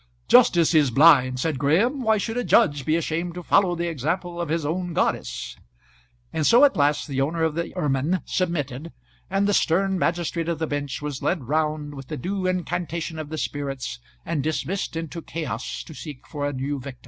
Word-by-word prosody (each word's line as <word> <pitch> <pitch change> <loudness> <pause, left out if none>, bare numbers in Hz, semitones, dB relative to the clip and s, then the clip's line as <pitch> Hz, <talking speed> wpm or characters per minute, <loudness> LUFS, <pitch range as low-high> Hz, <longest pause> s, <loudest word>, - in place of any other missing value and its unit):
"Justice 170 -1 +5
is 150 -4 +5
blind," 130 -1 +5
said 150 -1 -1
Graham. 205 - +2
"Why 220 -2 +3
should 225 +2 -3
a 245 - 0
judge 145 - +3
be 155 - +3
ashamed 170 +1 -2
to 180 - -6
follow 185 0 +3
the 170 0 -2
example 170 +3 -2
of 170 - -3
his 160 -1 -1
own 175 +3 -2
goddess?" - - -1 0.8
And 155 - 0
so 245 +5 +7
at 285 - +2
last 145 +1 +2
the 135 -2 -1
owner 160 +4 0
of 160 -1 +1
the 170 +2 -3
ermine 150 +5 0
submitted, 165 -4 -2 0.4
and 195 +1 +1
the 205 - +2
stern 190 +2 +2
magistrate 170 -1 -1
of 170 - -1
the 160 - -1
bench 145 -2 -4
was 145 -3 -4
led 170 -6 0
round 150 +2 -1
with 135 -2 -9
the - - -5
due 185 +6 -2
incantation 170 -2 -2
of 155 -2 -6
the 155 - -5
spirits, 135 - -4 0.3
and 155 -4 -1
dismissed 165 +6 -2
into 165 +1 -5
chaos 130 -8 -5
to 160 - -11
seek 150 -3 -9
for 145 -2 -3
a 145 - -3
new 140 +2 -3
victim. 130 -1 -9
160 Hz, 195 wpm, -24 LUFS, 145-175 Hz, 0.8 s, so